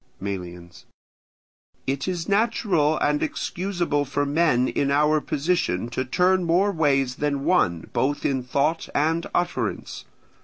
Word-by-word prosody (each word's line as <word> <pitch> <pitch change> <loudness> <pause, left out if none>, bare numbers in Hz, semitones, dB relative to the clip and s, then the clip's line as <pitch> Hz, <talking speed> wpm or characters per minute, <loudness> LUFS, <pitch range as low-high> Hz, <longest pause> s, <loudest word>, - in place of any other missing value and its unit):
Melians. 90 -3 -7 1.0
It 135 +3 -2
is 175 -3 -3
natural 200 -8 +2
and 150 0 +1
excusable 175 -5 -1
for 145 +1 -1
men 145 -4 +2
in 140 - 0
our 150 +2 +3
position 140 - -1
to 120 +2 -2
turn 180 +8 +2
more 180 +4 +2
ways 135 -7 +1
than 145 -1 -1
one 95 - +1
both 145 +2 0
in 135 -2 +1
thought 140 +6 -1
and 160 +3 +1
utterance. 175 - -2
145 Hz, 125 wpm, -24 LUFS, 130-170 Hz, 1.0 s, our